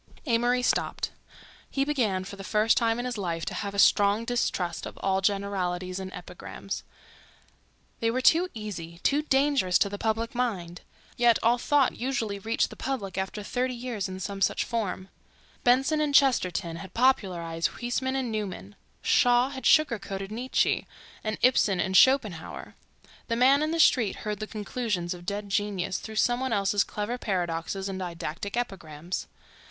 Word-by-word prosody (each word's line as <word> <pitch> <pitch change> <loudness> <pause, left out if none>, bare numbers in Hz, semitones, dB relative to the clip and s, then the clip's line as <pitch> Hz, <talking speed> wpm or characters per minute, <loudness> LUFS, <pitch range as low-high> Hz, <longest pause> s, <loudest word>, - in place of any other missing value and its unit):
Amory 245 0 +2
stopped. - - 0 0.6
He 275 0 0
began 225 -11 0
for 195 +1 -8
the 195 - -9
first 215 +3 +3
time 230 -1 +2
in 245 - -3
his 245 -3 -3
life 170 -3 -2
to - - -4
have 200 -1 -4
a - - -4
strong 205 +2 +4
distrust 185 -8 -1
of - - -10
all 190 0 +1
generalities 185 -2 -1
and 190 0 -6
epigrams. - - -7 1.2
They 230 - +1
were 245 +3 0
too 335 +7 +4
easy, 175 -6 -6
too 285 +1 +3
dangerous 270 -10 +2
to 200 - +2
the 205 0 -6
public 225 +1 -1
mind. 195 -9 -2 0.4
Yet 240 -2 +5
all 240 +2 +4
thought 285 +1 +2
usually 235 -6 -2
reached 225 +3 0
the - - -9
public 215 -9 -4
after 190 +2 -3
thirty 250 +4 -1
years 235 -5 -4
in 185 0 -6
some 195 +1 -5
such - - +2
form: 195 -4 -3 0.5
Benson 270 +5 +3
and 290 -2 0
Chesterton 185 - +3
had 190 +1 -10
popularized 180 -10 +1
Huysmans 260 +2 -1
and 255 -3 -2
Newman; 205 -2 -5 0.3
Shaw 245 +1 +4
had 265 -1 -3
sugar 310 -8 +4
coated 195 0 -6
Nietzsche 245 +4 0 0.4
and 215 -1 -2
Ibsen 210 -7 +4
and 190 +1 0
Schopenhauer. 215 -10 +3 0.5
The 230 - 0
man 265 +4 +5
in 305 - +1
the 330 +1 -1
street 245 -9 +4
heard 210 -1 -2
the 215 - -4
conclusions 210 -4 -3
of 175 0 -12
dead 205 0 -3
genius 195 -2 -1
through 220 - -8
some 240 +3 +2
one 260 -2 -1
else's 200 0 +2
clever 215 +4 -4
paradoxes 180 -1 -2
and 190 -1 -4
didactic 175 +3 -5
epigrams. 175 -7 -4
210 Hz, 165 wpm, -27 LUFS, 190-245 Hz, 1.2 s, Yet